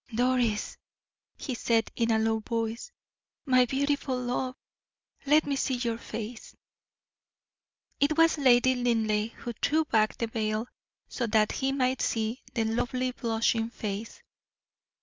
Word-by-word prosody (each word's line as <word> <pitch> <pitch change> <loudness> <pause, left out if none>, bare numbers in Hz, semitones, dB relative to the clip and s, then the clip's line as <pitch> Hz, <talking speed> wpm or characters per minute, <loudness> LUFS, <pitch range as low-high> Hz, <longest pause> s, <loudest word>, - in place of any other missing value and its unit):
"Doris," 245 -3 +1 0.6
he 265 - -4
said, 230 -2 +1
in 230 -1 0
a 225 - +3
low 220 0 +1
voice; 230 - -3 0.5
"my 255 -2 +5
beautiful 275 0 0
love, 250 +1 -2 0.7
let 305 +2 +5
me 280 - -1
see 265 -1 0
your 235 -2 -2
face." 225 0 -7 1.4
It 295 +2 +2
was 330 -1 +4
Lady 255 -1 +5
Linleigh 225 -3 +1
who 240 - -6
threw 310 +7 +1
back 215 -5 +1
the 230 - -1
veil, 220 0 -2 0.4
so 240 - -3
that 215 -1 +3
he 270 0 -1
might 260 -1 0
see 225 +3 -1
the 230 - +1
lovely, 245 +3 -1
blushing 230 -1 0
face. 215 -1 -6
240 Hz, 130 wpm, -28 LUFS, 225-260 Hz, 1.4 s, my